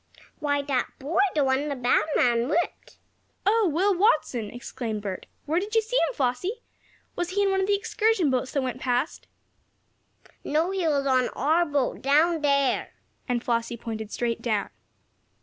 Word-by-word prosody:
"Why, 285 Hz, -2 st, 0 dB
that 270 Hz, -3 st, 0 dB
boy 305 Hz, +7 st, -2 dB, 0.2 s
the 295 Hz, -, +3 dB
one 270 Hz, +2 st, +1 dB
the 285 Hz, -, -2 dB
bad 250 Hz, +2 st, +2 dB
man 240 Hz, +1 st, +2 dB
whipped." 345 Hz, +3 st, -2 dB, 0.5 s
"Oh, 425 Hz, -1 st, +3 dB
Will 380 Hz, +6 st, +2 dB
Watson!" 345 Hz, -, +2 dB
exclaimed 230 Hz, -3 st, -5 dB
Bert. 190 Hz, -3 st, -5 dB, 0.2 s
"Where 320 Hz, +4 st, +1 dB
did 415 Hz, +4 st, -5 dB
you 450 Hz, -, +5 dB
see 455 Hz, +3 st, -4 dB
him, 335 Hz, -, +1 dB
Flossie? 290 Hz, -, -1 dB, 0.5 s
Was 350 Hz, 0 st, -2 dB
he 405 Hz, +2 st, +1 dB
in 395 Hz, -, +2 dB
one 385 Hz, 0 st, +1 dB
of 380 Hz, -, 0 dB
the 405 Hz, -, +3 dB
excursion 405 Hz, -5 st, +1 dB
boats 255 Hz, 0 st, -1 dB
that 275 Hz, -, 0 dB
went 255 Hz, 0 st, -4 dB
past?" 250 Hz, +3 st, -1 dB, 1.2 s
"No, 320 Hz, +5 st, +1 dB
he 380 Hz, -3 st, 0 dB
was 285 Hz, -3 st, +1 dB
on 255 Hz, -2 st, +2 dB
our 325 Hz, +5 st, +2 dB
boat 285 Hz, -3 st, -1 dB
down 310 Hz, +4 st, +3 dB
there," 280 Hz, -3 st, +1 dB, 0.3 s
and 245 Hz, -1 st, 0 dB
Flossie 235 Hz, 0 st, -1 dB
pointed 220 Hz, -2 st, -6 dB
straight 235 Hz, -1 st, -2 dB
down. 215 Hz, -4 st, -1 dB
285 Hz, 170 wpm, -26 LUFS, 245-350 Hz, 1.2 s, you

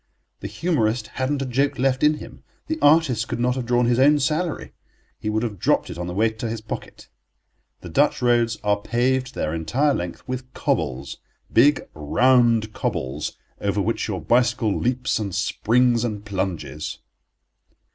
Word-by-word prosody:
The -, -, -5 dB
humorist 120 Hz, -10 st, 0 dB
hadn't 135 Hz, +1 st, 0 dB
a -, -, -3 dB
joke 135 Hz, +3 st, 0 dB
left 130 Hz, 0 st, +1 dB
in 150 Hz, +1 st, +4 dB
him. -, -, -11 dB, 0.2 s
The 320 Hz, 0 st, -3 dB
artist 145 Hz, -7 st, +4 dB
could -, -, -4 dB
not 125 Hz, +1 st, +2 dB
have 125 Hz, -2 st, -4 dB
drawn 120 Hz, 0 st, +3 dB
his 120 Hz, +1 st, +2 dB
own 145 Hz, +3 st, +6 dB
salary; 155 Hz, +4 st, -1 dB, 0.5 s
he 105 Hz, -, -3 dB
would 110 Hz, +1 st, 0 dB
have 105 Hz, -5 st, -4 dB
dropped -, -, +1 dB
it -, -, -8 dB
on 90 Hz, -, -3 dB
the 90 Hz, -, -5 dB
way 110 Hz, +2 st, +2 dB
to 110 Hz, +1 st, -5 dB
his 115 Hz, 0 st, -3 dB
pocket. 110 Hz, 0 st, -8 dB, 0.7 s
The -, -, -9 dB
Dutch -, -, +2 dB
roads 120 Hz, -2 st, +2 dB
are 100 Hz, -1 st, +1 dB
paved 125 Hz, +3 st, 0 dB
their 75 Hz, -, -2 dB
entire 125 Hz, -, +1 dB
length 85 Hz, +1 st, -5 dB
with 130 Hz, 0 st, -5 dB
cobbles—big, 80 Hz, -, 0 dB
round 115 Hz, -, +3 dB
cobbles, 65 Hz, +4 st, -3 dB, 0.2 s
over -, -, -1 dB
which -, -, -1 dB
your -, -, -3 dB
bicycle 120 Hz, -3 st, +2 dB
leaps 125 Hz, -1 st, 0 dB
and 100 Hz, -4 st, -3 dB
springs 120 Hz, +5 st, +2 dB
and 105 Hz, -3 st, -3 dB
plunges. 95 Hz, -6 st, -4 dB
120 Hz, 165 wpm, -23 LUFS, 105-130 Hz, 0.7 s, own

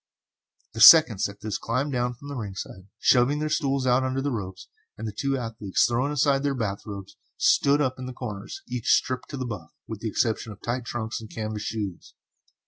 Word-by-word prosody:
The 110 Hz, -, -4 dB
seconds 115 Hz, -, +8 dB
at 100 Hz, 0 st, -13 dB
this 105 Hz, -2 st, -3 dB
climbed 130 Hz, +5 st, -1 dB
down 125 Hz, 0 st, -1 dB
from 140 Hz, +4 st, -12 dB
the 140 Hz, -, -5 dB
ringside, 95 Hz, -4 st, -7 dB
shoving 125 Hz, +4 st, +3 dB
their 155 Hz, 0 st, -2 dB
stools 140 Hz, -4 st, 0 dB
out 125 Hz, +1 st, +3 dB
under 130 Hz, 0 st, -1 dB
the 140 Hz, +1 st, -1 dB
ropes, 95 Hz, -4 st, -6 dB, 0.3 s
and 110 Hz, -, -5 dB
the 105 Hz, -, -6 dB
two 135 Hz, +3 st, -1 dB
athletes, 110 Hz, -5 st, 0 dB
throwing 125 Hz, +4 st, 0 dB
aside 140 Hz, -1 st, +2 dB
their 140 Hz, -1 st, 0 dB
bath 105 Hz, -5 st, -3 dB
robes, 100 Hz, -2 st, -8 dB, 0.2 s
stood 145 Hz, +1 st, +3 dB
up 130 Hz, -2 st, -1 dB
in 130 Hz, -, -5 dB
their 130 Hz, -, -6 dB
corners, 105 Hz, -6 st, -7 dB
each 120 Hz, -2 st, -3 dB
stripped 130 Hz, -1 st, +1 dB
to 140 Hz, -, -6 dB
the 130 Hz, -, -3 dB
buff, 100 Hz, -9 st, -6 dB, 0.2 s
with 110 Hz, -2 st, -6 dB
the 115 Hz, -, -3 dB
exception 110 Hz, +1 st, -1 dB
of 105 Hz, -, -11 dB
tight 120 Hz, +1 st, -2 dB
trunks 115 Hz, -1 st, -4 dB
and 110 Hz, -, -10 dB
canvas 110 Hz, -1 st, -4 dB
shoes. 105 Hz, -5 st, -5 dB
120 Hz, 210 wpm, -26 LUFS, 105-135 Hz, 0.3 s, seconds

